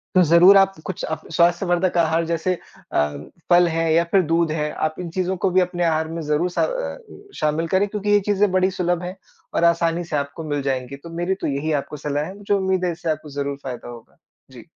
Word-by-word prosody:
तो 185 - +7
ज़रूर 170 +5 +7
आप 195 0 +4
कुछ 190 - -5
अप 160 - -3
स्वास्थ्यवर्धक 175 +1 +2
आहार 165 0 +2
जैसे 170 +2 0 0.4
अ, 75 0 +1 0.3
फल 175 0 +6
है 165 0 0
या 165 +1 +4
फिर 195 - +5
दूध 165 -1 +2
है, 150 -1 -2
आप 155 0 -2
इन 175 -2 -5
चीज़ों 185 0 0
को 190 - +1
भी 185 +1 +4
अपने 175 -1 -1
आहार 160 -1 +1
में 165 0 -5
ज़रूर 150 +4 0
स - - -14
अ, - - -1 0.4
शामिल 155 +2 0
करें 190 +4 +2
क्योंकि 210 0 -4
ये 205 - +5
चीज़ें 205 -1 +3
बड़ी 185 0 +2
सुलभ 175 -1 -1
हैं 180 +1 -5 0.4
और - - +1
आसानी 170 0 +2
से 165 -2 -5
आपको 140 +3 -4
मिल 145 -1 -1
जाएँगी। 135 -1 -3
तो 170 - -9
मेरी 175 +2 0
तो - - -1
यही 145 +3 -2
आपको 150 - -9
सलाह 145 +1 -2
है, 190 +4 -9
मुझे 205 0 -2
उम्मीद 190 -2 +1
है 175 - +1
इससे 170 0 -5
आपको 155 0 -5
ज़रूर 140 0 -3
फायदा 125 -2 -6
होगा। 120 -1 -13 0.3
जी। - - -13
170 Hz, 225 wpm, -22 LUFS, 155-185 Hz, 0.4 s, तो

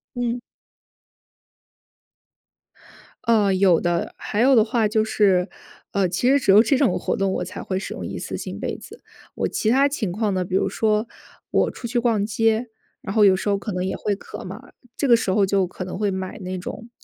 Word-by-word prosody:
嗯。 240 0 -2 2.8
呃， 215 -5 +3
有 185 -3 +4
的。 175 -1 -1
还 210 - -3
有 265 +3 +5
的 220 - +6
话， 220 -1 +1
就 215 0 +1
是， 195 -4 +2 0.4
呃， 195 -2 +1
其 190 +8 0
实 280 - +5
只 215 - +1
有 205 +3 +8
这 255 +4 +2
种 275 - +2
活 - - -2
动， 195 -1 0
我 - - -2
才 185 +3 -7
会 185 - -2
使 195 - -6
用 - - -6
一 - - -5
次 - - -5
性 - - -6
杯 - - -3
子。 - - -13 0.3
我 - - -1
其 215 - -1
他 270 +5 +4
情 250 -9 -3
况 210 +3 -1
呢， 185 -1 -1
比 180 - -6
如 - - +1
说， 215 0 0 0.4
我 - - +2
出 240 - -8
去 240 +1 -1
逛 230 -4 +1
街， 225 +2 +1 0.3
然 195 - -5
后 215 -2 +5
有 190 -2 +6
时 200 - -4
候 200 -1 +2
可 210 +2 -5
能 180 0 -2
也 190 - -2
会 205 -1 -1
渴 - - -9
嘛， - - -10 0.2
这 285 - 0
个 240 -3 +6
时 215 - -2
候 195 +1 +3
就 195 -1 +1
可 185 +1 -7
能 185 - -6
会 205 -1 +1
买 190 -1 -5
那 185 -1 -5
种 225 +5 -7
210 Hz, 230 characters per minute, -22 LUFS, 190-230 Hz, 2.8 s, 有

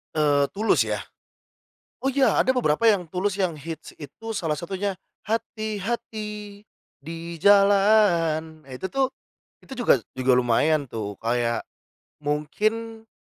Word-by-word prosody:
Eee, 145 -2 +3
Tulus 215 +3 +2
ya? - - -2 1.0
Oh, 270 - 0
iya, 275 -1 +3
ada 260 - +3
beberapa 230 -4 +2
yang 205 -5 +5
Tulus 190 +3 -1
yang 180 -6 -1
hits, 160 +2 -7
itu 225 +9 -9
salah 165 -7 -1
satunya 190 +5 -3 0.3
hati-hati 215 -1 -4 0.4
di 165 +3 -7 0.2
jalan. 195 -6 +4
Ah, 135 - -16
itu 130 +9 -4
tuh, 270 +2 0 0.5
itu 265 - -10
juga 230 - +3 0.2
juga 130 0 +3
lumayan 135 +4 +2
tuh, 105 -3 -5
kayak 115 0 0 0.6
mungkin, 215 +10 -2
190 Hz, 125 wpm, -24 LUFS, 150-215 Hz, 1.0 s, yang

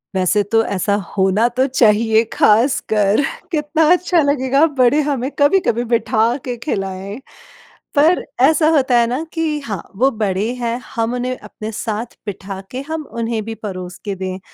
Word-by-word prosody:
वैसे 190 +3 +2
तो 225 0 +4
ऐसा 200 +2 0 0.2
होना 195 +4 +3
तो 260 - +5
चाहिए 225 -3 +3
ख़ासकर 215 -2 +3 0.3
कितना 310 0 +1
अच्छा 360 -1 +3
लगेगा 280 0 +2
बड़े 255 +4 +4
हमें 265 -3 -1
कभी 285 +7 +5
कभी 235 +1 +1
बिठा 230 0 +2
के 250 -2 -3
खिलाएँ। 195 -5 -4 0.8
पर 315 +5 +4 0.2
ऐसा 310 +3 +4
होता 260 -4 +3
है 235 - +3
ना 255 +7 -2
कि 320 -2 -1
हाँ, 205 -6 -4
वो 265 +7 +3
बड़े 200 +2 0
हैं 235 -1 -2 0.2
हम 230 +1 0
उन्हें 250 +1 -3
अपने 220 -1 -8
साथ 225 +1 -4
बिठा 195 -1 -6
के 255 - -4
हम 320 -1 -3
उन्हें 230 -1 -1
भी 225 0 -5
परोस 185 -2 -6
के 200 -1 -3
दें। 185 0 -5
235 Hz, 160 wpm, -18 LUFS, 210-275 Hz, 0.8 s, तो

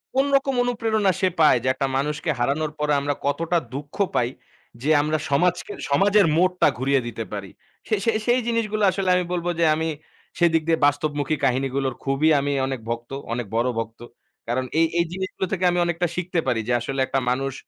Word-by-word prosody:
কোন 270 +1 +3
রকম 275 0 +2
অনুপ্রেরণা 225 -4 +1
সে 190 - +4
পায় 155 -5 +6
যে - - -2
একটা 135 - -1
মানুষকে 150 +4 -2
হারানোর 145 +5 0
পরে 150 0 +1
আমরা 145 +1 0
কতটা 165 +5 0 0.2
দুঃখ 145 +2 -7 0.2
পাই 120 -1 +2 0.5
যে 145 - -1
আমরা 155 +1 0
সমাজকে 175 +5 +1 0.2
সমাজের 200 +7 +4
মোড়টা 180 -1 +3
ঘুরিয়ে 135 +1 +1
দিতে 115 -1 -4
পারি? 100 -2 -5 0.4
সে 220 - +2
সে 230 - +4 0.2
সেই 240 +1 +4
জিনিসগুলা 215 -3 0
আসলে 190 -1 -1
আমি 180 - +2
বলব 175 -1 -2
যে 170 - +4
আমি 160 +1 -1 0.5
সেদিক 165 -2 +4
দিয়ে 165 -1 +2
বাস্তবমুখী 145 0 0
কাহিনীগুলোর 135 0 0
খুবই 135 +3 +2
আমি 140 +1 -1 0.2
অনেক 135 -2 -3
ভক্ত, 120 0 -4 0.2
অনেক 120 0 -3
বড় 120 +2 +2
ভক্ত। 115 0 -6 0.5
কারণ 125 +2 -1
এই 165 - +5
এই 170 - +3
জিনিসগুলো 190 0 -3
থেকে 185 -1 -2
আমি 175 - 0
অনেকটা 175 +1 0
শিখতে 180 -1 -1
পারি 120 -3 +1
যে 120 - +1
আসলে 135 +3 -4
একটা 135 - 0
মানুষ 135 +2 -1
150 Hz, 185 wpm, -23 LUFS, 135-180 Hz, 0.5 s, পায়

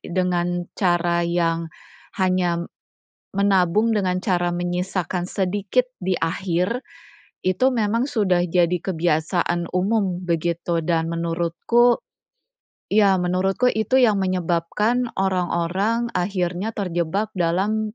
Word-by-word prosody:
dengan 175 -1 -1
cara 175 -2 +2
yang 170 -1 0 0.5
hanya 185 -3 +1 0.7
menabung 200 +2 +3
dengan 185 -3 0
cara 180 -3 0
menyisakan 175 +1 -2
sedikit 200 +6 0 0.2
di 185 -1 0
akhir, 180 +7 -1 0.6
itu 185 +6 +1
memang 230 +3 +1
sudah 185 -8 +1
jadi 175 +1 +2
kebiasaan 170 0 0
umum, 185 -1 0
begitu, 170 0 -1
dan 165 -1 0
menurutku 170 +9 +1 0.9
iya, 205 -2 +5
menurutku 190 +7 +1
itu 235 +4 +2
yang 215 -5 +4
menyebabkan 185 +6 0
orang-orang 190 +5 0
akhirnya 180 +2 -1
terjebak 185 +2 -1
dalam 210 +6 0
180 Hz, 95 wpm, -22 LUFS, 175-205 Hz, 0.9 s, iya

